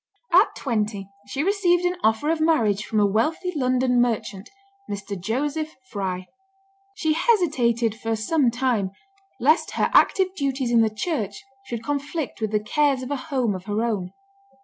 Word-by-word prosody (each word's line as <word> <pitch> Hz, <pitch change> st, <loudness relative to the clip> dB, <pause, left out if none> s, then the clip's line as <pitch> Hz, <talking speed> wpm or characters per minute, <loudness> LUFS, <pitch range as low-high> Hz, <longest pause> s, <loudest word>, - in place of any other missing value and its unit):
At 375 Hz, +6 st, +5 dB
twenty 215 Hz, -6 st, -2 dB, 0.2 s
she 270 Hz, +8 st, -2 dB
received 360 Hz, -2 st, +2 dB
an 355 Hz, 0 st, +1 dB
offer 225 Hz, +8 st, +2 dB
of 325 Hz, -1 st, -1 dB
marriage 225 Hz, -11 st, +2 dB
from 215 Hz, -, 0 dB
a 205 Hz, -, +5 dB
wealthy 310 Hz, -, 0 dB
London 255 Hz, -2 st, +2 dB
merchant, 215 Hz, -4 st, -2 dB, 0.4 s
Mr. 200 Hz, 0 st, -5 dB
Joseph 285 Hz, -, -2 dB, 0.2 s
Fry. 185 Hz, -3 st, -3 dB, 0.7 s
She 315 Hz, -4 st, +1 dB
hesitated 265 Hz, -, +2 dB
for 225 Hz, 0 st, -2 dB
some 250 Hz, +5 st, +2 dB
time, 240 Hz, -5 st, 0 dB, 0.5 s
lest 300 Hz, +7 st, +3 dB
her -, -, 0 dB
active 375 Hz, -1 st, +4 dB
duties 270 Hz, -5 st, -1 dB
in 235 Hz, -1 st, +5 dB
the 220 Hz, -, +3 dB
church 215 Hz, -, -3 dB, 0.2 s
should 235 Hz, -2 st, -5 dB
conflict 290 Hz, 0 st, -3 dB
with 220 Hz, -, 0 dB
the 210 Hz, 0 st, +1 dB
cares 275 Hz, +2 st, +1 dB
of 255 Hz, -, -6 dB
a -, -, +1 dB
home 255 Hz, -7 st, +1 dB
of 185 Hz, -1 st, -7 dB
her 210 Hz, +2 st, -1 dB
own. 200 Hz, -6 st, -2 dB
245 Hz, 160 wpm, -24 LUFS, 215-305 Hz, 0.7 s, At